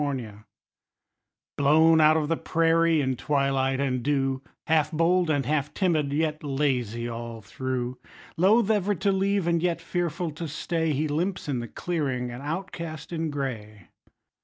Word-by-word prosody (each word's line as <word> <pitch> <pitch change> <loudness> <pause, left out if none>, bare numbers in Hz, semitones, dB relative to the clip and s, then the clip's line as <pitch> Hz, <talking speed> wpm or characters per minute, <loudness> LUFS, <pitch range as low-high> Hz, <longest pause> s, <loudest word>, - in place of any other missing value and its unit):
COYOTE 115 -7 -4 1.1
Blown 160 +3 +5
out 155 +1 +6
of 155 -2 0
the 165 - +1
prairie 165 -1 +2
in 130 -1 0
twilight 135 -1 0
and 130 -3 0
dew, 135 0 0 0.2
Half 155 -2 +2
bold 170 +2 +2
and 145 -3 +1
half 150 -1 -1
timid, 160 -7 +1
yet 155 +1 -1
lazy 130 -5 -1
all 115 -1 -6
through; 125 +2 -4 0.4
Loath 210 +5 +4
ever 205 -1 +1
to 195 +2 +1
leave, 195 -1 +1
and 170 -1 +1
yet 175 -1 0
fearful 170 -1 -2
to 160 +2 -6
stay, 160 +2 -1
He 150 +2 0
limps 170 +6 -2
in 135 -4 -1
the 120 - -5
clearing, 130 -5 -2
an 120 +2 -7
outcast 165 0 -5
in 165 -1 -1
gray. 110 - -5
150 Hz, 155 wpm, -26 LUFS, 130-165 Hz, 1.1 s, out